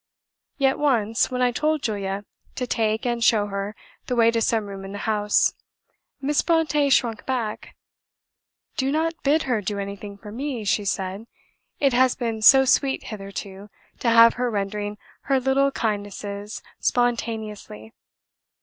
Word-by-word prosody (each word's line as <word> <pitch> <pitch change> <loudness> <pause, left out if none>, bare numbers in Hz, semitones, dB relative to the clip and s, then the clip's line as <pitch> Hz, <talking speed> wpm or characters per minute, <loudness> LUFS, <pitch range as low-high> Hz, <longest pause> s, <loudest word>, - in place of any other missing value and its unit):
Yet 270 -1 +2
once 230 -6 +2
when 250 -1 -1
I 245 - +3
told 305 +4 0
Julia 200 -2 -3 0.3
to 250 - -2
take 220 -1 0
and 240 -1 0
show 220 -3 +4
her 200 +1 -4 0.3
the 250 - -1
way 230 -1 +5
to 230 0 0
some 225 -1 +1
room 195 -1 -8
in 195 +1 -8
the - - -5
house, 210 -1 +2 0.7
Miss 285 +1 +1
Brontë 305 -4 +2
shrunk 235 -4 +2
back: 240 -5 -3 1.0
"Do 265 +1 0
not 320 +2 0
BID 300 +3 +2
her 245 -5 0
do 205 +1 -3
anything 200 0 -6
for 210 0 -11
me," 250 -1 -4
she 205 +1 +1
said; 195 +3 -3 0.5
"it 275 -3 +3
has 255 +1 +4
been 230 -3 -3
so 265 +4 +8
sweet 270 +1 +2
hitherto 195 0 -8 0.3
to 240 - +1
have 230 0 +7
her 250 - +1
rendering 205 0 -3 0.3
her 270 -1 +2
little 270 +2 +2
kindnesses 205 -2 -4 0.2
SPONTANEOUSLY." 220 - -2
225 Hz, 150 wpm, -24 LUFS, 205-260 Hz, 1.0 s, so